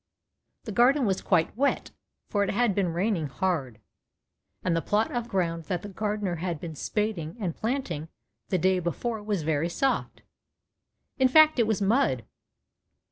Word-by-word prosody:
The 220 Hz, -, -6 dB
garden 250 Hz, +5 st, +4 dB
was 190 Hz, -3 st, 0 dB
quite 170 Hz, -1 st, +1 dB
wet, 275 Hz, +4 st, 0 dB, 0.4 s
for 205 Hz, -1 st, +1 dB
it 200 Hz, -, -1 dB
had 235 Hz, 0 st, +2 dB
been 185 Hz, -3 st, 0 dB
raining 175 Hz, -2 st, 0 dB
hard, 135 Hz, -7 st, -2 dB, 0.8 s
and 175 Hz, -2 st, +1 dB
the 165 Hz, -, +1 dB
plot 210 Hz, +5 st, +1 dB
of 240 Hz, -1 st, -2 dB
ground 170 Hz, -5 st, -1 dB
that 180 Hz, -3 st, -3 dB
the 205 Hz, -, -6 dB
gardener 205 Hz, -2 st, -2 dB
had 170 Hz, -1 st, -3 dB
been 165 Hz, 0 st, -6 dB
spading 180 Hz, -, -2 dB
and 180 Hz, -6 st, -2 dB
planting 220 Hz, -, -2 dB, 0.4 s
the 185 Hz, -, +2 dB
day 185 Hz, +1 st, +2 dB
before 215 Hz, +6 st, -3 dB
was 205 Hz, -5 st, -2 dB
very 155 Hz, +1 st, 0 dB
soft. 270 Hz, +10 st, -1 dB, 1.0 s
In 260 Hz, -, +6 dB
fact 310 Hz, +1 st, +6 dB
it 230 Hz, -, +4 dB
was 215 Hz, -2 st, 0 dB
mud. 195 Hz, -, +2 dB
195 Hz, 160 wpm, -27 LUFS, 165-220 Hz, 1.0 s, In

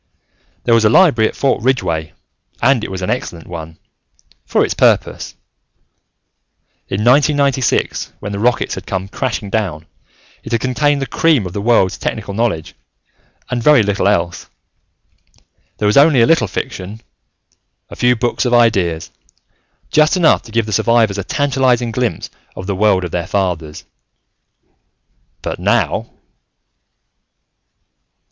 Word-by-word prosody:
There 120 Hz, -, +2 dB
was 115 Hz, -1 st, +4 dB
a 105 Hz, -, +5 dB
library 115 Hz, -, +4 dB
at -, -, -11 dB
Fort 135 Hz, -4 st, 0 dB
Ridgeway, 80 Hz, -, -1 dB, 0.5 s
and 120 Hz, -2 st, +2 dB
it -, -, -4 dB
was 95 Hz, -1 st, -5 dB
an -, -, -1 dB
excellent 90 Hz, -9 st, -4 dB
one... 80 Hz, -2 st, -8 dB, 0.7 s
for -, -, +2 dB
its -, -, -2 dB
purpose. -, -, +1 dB, 1.5 s
In 100 Hz, +2 st, -2 dB
1996, 140 Hz, 0 st, +2 dB
when 100 Hz, -, -6 dB
the 100 Hz, -, -4 dB
rockets 120 Hz, +2 st, 0 dB
had -, -, -8 dB
come 95 Hz, 0 st, -3 dB
crashing 105 Hz, -2 st, -4 dB
down, 90 Hz, -8 st, -2 dB, 0.6 s
it 115 Hz, -, -7 dB
had 115 Hz, -, +2 dB
contained 140 Hz, +3 st, 0 dB
the -, -, -2 dB
cream 150 Hz, -7 st, +1 dB
of 90 Hz, -, -7 dB
the 100 Hz, -, -3 dB
world's 105 Hz, -4 st, +2 dB
technical 105 Hz, -2 st, -4 dB
knowledge 100 Hz, -8 st, -2 dB, 0.8 s
and 120 Hz, -1 st, -1 dB
very 145 Hz, -2 st, +5 dB
little 100 Hz, -1 st, 0 dB
else. 85 Hz, -4 st, -1 dB, 1.3 s
There 105 Hz, -, -2 dB
was 105 Hz, +4 st, +3 dB
only 140 Hz, -3 st, +6 dB
a -, -, +6 dB
little 160 Hz, -7 st, +3 dB
fiction, 95 Hz, +3 st, -6 dB, 0.9 s
a -, -, -8 dB
few 125 Hz, 0 st, +2 dB
books 120 Hz, +1 st, -1 dB
of 125 Hz, -2 st, +2 dB
ideas, 95 Hz, -9 st, +1 dB, 0.8 s
just 155 Hz, +4 st, +3 dB
enough 170 Hz, -3 st, +4 dB
to 115 Hz, -, -15 dB
give 115 Hz, 0 st, 0 dB
the 110 Hz, -, -5 dB
survivors 110 Hz, -1 st, +2 dB
a -, -, -3 dB
tantalizing 130 Hz, -1 st, 0 dB
glimpse 120 Hz, 0 st, -3 dB, 0.2 s
of 95 Hz, -, -7 dB
the 100 Hz, 0 st, -2 dB
world 95 Hz, -2 st, +2 dB
of 90 Hz, -, -5 dB
their 85 Hz, -1 st, -3 dB
fathers. 85 Hz, -6 st, -3 dB, 1.6 s
But -, -, -4 dB
now.... -, -, 0 dB
110 Hz, 140 wpm, -16 LUFS, 95-125 Hz, 1.6 s, only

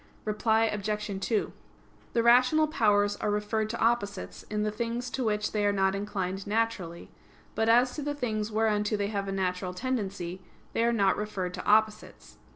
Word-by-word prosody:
Reply 220 Hz, +1 st, +2 dB
Obj. 210 Hz, -1 st, -2 dB
2: 215 Hz, +1 st, 0 dB, 0.6 s
The 230 Hz, -, +2 dB
rational 255 Hz, +6 st, +5 dB
powers 205 Hz, -9 st, +2 dB
are 210 Hz, -, -2 dB
referred 210 Hz, +1 st, -1 dB
to 235 Hz, -, -4 dB
opposites 205 Hz, -4 st, -1 dB
in 210 Hz, 0 st, -1 dB
the 210 Hz, -, 0 dB
things 235 Hz, +3 st, -3 dB
to 260 Hz, -, -2 dB
which 210 Hz, -2 st, 0 dB
they 210 Hz, -1 st, 0 dB
are 205 Hz, -, +3 dB
not 190 Hz, -1 st, +2 dB
inclined 195 Hz, -1 st, -3 dB
naturally; 205 Hz, -6 st, -2 dB, 0.4 s
but 225 Hz, 0 st, +1 dB
as 245 Hz, +2 st, +4 dB
to -, -, -3 dB
the 290 Hz, 0 st, -2 dB
things 220 Hz, -5 st, -2 dB
whereunto 215 Hz, -1 st, +1 dB
they 200 Hz, 0 st, -1 dB
have 200 Hz, -2 st, -2 dB
a -, -, -2 dB
natural 180 Hz, -1 st, -2 dB
tendency, 195 Hz, -7 st, -3 dB, 0.3 s
they 230 Hz, -, +1 dB
are 235 Hz, -, +3 dB
not 200 Hz, -4 st, +2 dB
referred 195 Hz, -4 st, -3 dB
to -, -, -6 dB
opposites. 215 Hz, 0 st, +1 dB
210 Hz, 175 wpm, -28 LUFS, 200-230 Hz, 0.6 s, rational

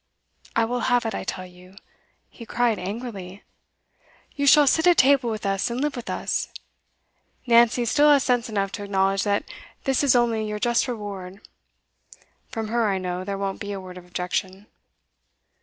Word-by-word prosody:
I 230 Hz, -, +3 dB
will 245 Hz, +2 st, -2 dB
have 245 Hz, -1 st, +2 dB
it, 225 Hz, -, -2 dB
I -, -, -4 dB
tell 185 Hz, -1 st, -5 dB
you!' 180 Hz, +1 st, -16 dB, 0.5 s
he 235 Hz, -, -13 dB
cried 235 Hz, -1 st, 0 dB
angrily. 200 Hz, -2 st, -6 dB, 0.9 s
'You 280 Hz, -1 st, 0 dB
shall 295 Hz, +1 st, +7 dB
sit 320 Hz, +5 st, +3 dB
at 350 Hz, -, +5 dB
table 265 Hz, -2 st, +4 dB
with 220 Hz, -2 st, -4 dB
us, 195 Hz, +4 st, 0 dB
and 235 Hz, +1 st, -3 dB
live 295 Hz, +1 st, -1 dB
with 245 Hz, -, -7 dB
us. -, -, -2 dB, 0.9 s
Nancy 240 Hz, 0 st, +4 dB
still 295 Hz, +5 st, +4 dB
has 280 Hz, -2 st, +5 dB
sense 245 Hz, -2 st, 0 dB
enough 200 Hz, -2 st, -1 dB
to 205 Hz, -, -6 dB
acknowledge 195 Hz, -1 st, +1 dB
that 205 Hz, 0 st, +1 dB, 0.4 s
this 270 Hz, 0 st, +1 dB
is 275 Hz, -3 st, +4 dB
only 230 Hz, -2 st, +2 dB
your 210 Hz, 0 st, -3 dB
just 240 Hz, +3 st, +1 dB
reward; 200 Hz, -5 st, -7 dB, 1.0 s
from 225 Hz, -4 st, -4 dB
her, 230 Hz, -1 st, +1 dB
I 195 Hz, -, 0 dB
know, 180 Hz, 0 st, -4 dB
there 200 Hz, +1 st, -4 dB
won't 195 Hz, -1 st, -3 dB
be 205 Hz, 0 st, -5 dB
a 195 Hz, -, -5 dB
word 185 Hz, -1 st, -10 dB
of 180 Hz, -1 st, -11 dB
objection. 185 Hz, +2 st, -3 dB
220 Hz, 175 wpm, -24 LUFS, 195-245 Hz, 1.0 s, shall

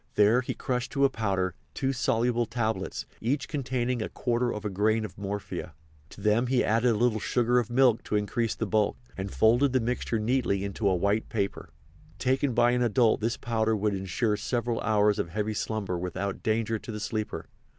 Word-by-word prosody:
There 105 Hz, +4 st, +5 dB
he 125 Hz, -, -4 dB
crushed 125 Hz, -1 st, -2 dB
to 140 Hz, -1 st, +3 dB
a 135 Hz, -, +2 dB
powder 95 Hz, -5 st, -1 dB, 0.2 s
two 135 Hz, -1 st, 0 dB
soluble 120 Hz, -2 st, +1 dB
tablets, 110 Hz, -2 st, -2 dB, 0.2 s
each 135 Hz, +4 st, -1 dB
containing 125 Hz, -4 st, -1 dB
a -, -, -3 dB
quarter 120 Hz, 0 st, 0 dB
of 105 Hz, -, -5 dB
a -, -, 0 dB
grain 110 Hz, +3 st, +1 dB
of 95 Hz, -3 st, -9 dB
morphia. 100 Hz, 0 st, -5 dB, 0.3 s
To -, -, -12 dB
them 110 Hz, +4 st, +2 dB
he 125 Hz, 0 st, +2 dB
added 115 Hz, +3 st, +2 dB
a 115 Hz, -, +2 dB
little 115 Hz, -1 st, +2 dB
sugar 120 Hz, +2 st, +2 dB
of 120 Hz, -, -2 dB
milk 120 Hz, -2 st, +3 dB
to -, -, -2 dB
increase 110 Hz, +2 st, 0 dB
the 115 Hz, -, -2 dB
bulk, 105 Hz, 0 st, +1 dB, 0.2 s
and 95 Hz, +1 st, -4 dB
folded 120 Hz, +5 st, +3 dB
the 130 Hz, -, +4 dB
mixture 120 Hz, -1 st, -1 dB
neatly 110 Hz, -3 st, 0 dB
in 100 Hz, 0 st, -4 dB
a 100 Hz, -4 st, +2 dB
white 100 Hz, +4 st, 0 dB
paper. 100 Hz, -3 st, -3 dB, 0.5 s
Taken 130 Hz, 0 st, +1 dB
by 120 Hz, 0 st, +4 dB
an 125 Hz, 0 st, +1 dB
adult 115 Hz, -1 st, +3 dB
this 115 Hz, +2 st, 0 dB
powder 110 Hz, -2 st, 0 dB
would 105 Hz, 0 st, 0 dB
insure 100 Hz, +3 st, -1 dB
several 120 Hz, +2 st, -1 dB
hours 105 Hz, -1 st, +2 dB
of 85 Hz, -, -1 dB
heavy 105 Hz, +4 st, -2 dB
slumber 100 Hz, -4 st, -2 dB
without 90 Hz, +2 st, -3 dB
danger 110 Hz, 0 st, 0 dB
to 115 Hz, -, -8 dB
the 105 Hz, -, -5 dB
sleeper. 110 Hz, 0 st, -3 dB
110 Hz, 195 wpm, -28 LUFS, 105-120 Hz, 0.5 s, There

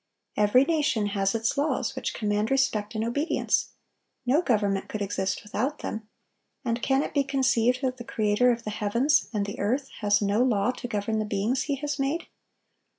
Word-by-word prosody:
Every 210 Hz, +6 st, +4 dB
nation 290 Hz, -10 st, +1 dB
has 195 Hz, 0 st, 0 dB
its 230 Hz, +5 st, 0 dB
laws, 295 Hz, +2 st, 0 dB
which -, -, -3 dB
command 210 Hz, 0 st, 0 dB
respect 245 Hz, -6 st, +1 dB
and 215 Hz, -, 0 dB
obedience; 285 Hz, +8 st, 0 dB, 0.6 s
no 275 Hz, +7 st, +3 dB
government 205 Hz, -, 0 dB
could 210 Hz, -1 st, -3 dB
exist 195 Hz, 0 st, -2 dB
without 240 Hz, +8 st, -3 dB
them; 220 Hz, -1 st, -5 dB, 0.6 s
and 235 Hz, 0 st, -1 dB
can 270 Hz, +1 st, +2 dB
it -, -, -5 dB
be 280 Hz, -, +3 dB
conceived 260 Hz, -2 st, +2 dB
that 255 Hz, -1 st, 0 dB
the 240 Hz, -, -7 dB
Creator 230 Hz, -1 st, +2 dB
of 235 Hz, -1 st, -3 dB
the 215 Hz, -, -4 dB
heavens 235 Hz, +9 st, +1 dB
and 210 Hz, -3 st, -1 dB
the 200 Hz, -, -6 dB
earth 260 Hz, +7 st, 0 dB
has 205 Hz, -1 st, +3 dB
no 205 Hz, +2 st, +1 dB
law 235 Hz, -3 st, +2 dB
to 250 Hz, -, -7 dB
govern 215 Hz, -1 st, -1 dB
the -, -, 0 dB
beings 210 Hz, +5 st, 0 dB
He 285 Hz, -, 0 dB
has 290 Hz, +1 st, -4 dB
made? 280 Hz, +5 st, 0 dB
230 Hz, 185 wpm, -27 LUFS, 210-270 Hz, 0.6 s, Every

